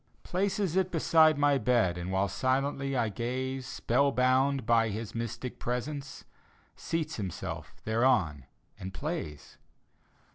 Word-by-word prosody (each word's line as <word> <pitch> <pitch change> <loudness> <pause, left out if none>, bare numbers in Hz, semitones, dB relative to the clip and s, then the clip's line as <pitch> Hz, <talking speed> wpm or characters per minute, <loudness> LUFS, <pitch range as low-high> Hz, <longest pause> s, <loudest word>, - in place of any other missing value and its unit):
Places 195 -1 -1
it 190 -1 +2
beside 160 -2 +4
my 145 -1 +3
bed. 115 -7 +2
And 90 +1 -5
while 95 +1 +1
silently 135 +3 0
I 115 -3 +1
gaze 130 +4 -3
Spell 135 +1 +1
bound 130 +1 +2
by 115 -1 +3
his 110 +1 -5
mystic 115 +2 -5
presence, 135 +3 -4 0.5
Seats 160 -2 -3
himself 95 -6 -5
thereon 110 - +1 0.3
and 95 +1 -7
plays. 150 - -5
130 Hz, 120 wpm, -30 LUFS, 110-145 Hz, 0.5 s, beside